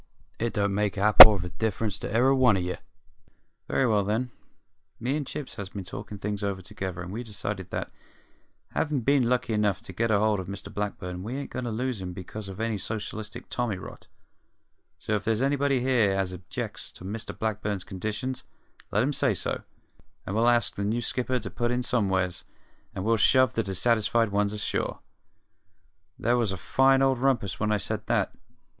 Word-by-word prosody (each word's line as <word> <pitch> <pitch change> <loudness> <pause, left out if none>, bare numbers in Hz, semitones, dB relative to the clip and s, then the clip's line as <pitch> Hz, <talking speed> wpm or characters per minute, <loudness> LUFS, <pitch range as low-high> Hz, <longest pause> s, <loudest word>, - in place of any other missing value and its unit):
It 115 0 -1
don't 100 -1 0
make 105 0 0
a - - -1
hap'orth 105 -2 +10
of 90 - -7
difference 110 -2 -1
to - - -4
e'er 120 +4 +4
a 135 - +4
one 125 -6 +4
of 90 - -1
ye! 90 +1 -2 0.9
Very 135 - +1
well, 105 -4 +3
then; 110 +5 -1 0.7
me 125 +5 -1
and 150 -3 -3
Chips 145 - -6
has 100 -3 -5
been 100 -1 -6
talkin' 105 +3 -8
things 105 +1 -4
over 100 -2 -1
together 95 -1 -6
and 90 - -7
we've 115 +4 -4
decided 100 -3 -5
that, - - -4 0.8
havin' 150 -4 0
been 135 -1 +3
lucky 125 -2 0
enough 105 -3 +1
to 95 - -9
get 115 +5 0
hold 105 -1 +2
of 95 - -6
Mr 100 +1 -7
Blackburn, 90 -3 -4
we 115 +7 -5
ain't 140 - -6
goin' 130 - -4
to - - -2
lose 120 -1 -2
'im 90 -1 -5
because 100 +3 -7
of 95 +1 -9
any 110 -2 -1
socialistic 110 +2 -5
tommy 120 -6 -1
rot; 95 - -11 0.9
so 110 - -3
if 105 -1 0
there's 115 +2 +1
anybody 140 -1 +1
here 120 -6 +3
as 95 -1 -1
objects 90 0 -5
to 90 - -11
Mr 105 +3 -5
Blackburn's 105 -3 -2
conditions, 110 +6 -4 0.5
let 105 +3 +2
'im 145 +3 0
say - - +1
so, - - -2 0.6
and 95 - -4
we'll 115 +2 +4
ask 120 -2 +3
the 100 - -4
new 115 +4 -1
skipper 125 +2 -1
to 115 - -6
put 120 0 -1
in 125 +1 0
somewheres, 95 -8 0 0.5
and 95 - -4
we'll 115 +1 +3
shove 130 +3 +4
the 115 - +1
dissatisfied 110 +3 +1
ones 100 0 +1
ashore.' 105 -1 -2 1.2
"There 120 +2 +2
was 115 -5 +1
a 95 - -3
fine 135 +8 +3
old 135 -2 +2
rumpus 120 -7 0
when 105 0 0
I 105 - +3
said 100 - -4
that. - - +1
110 Hz, 195 wpm, -27 LUFS, 100-120 Hz, 1.2 s, hap'orth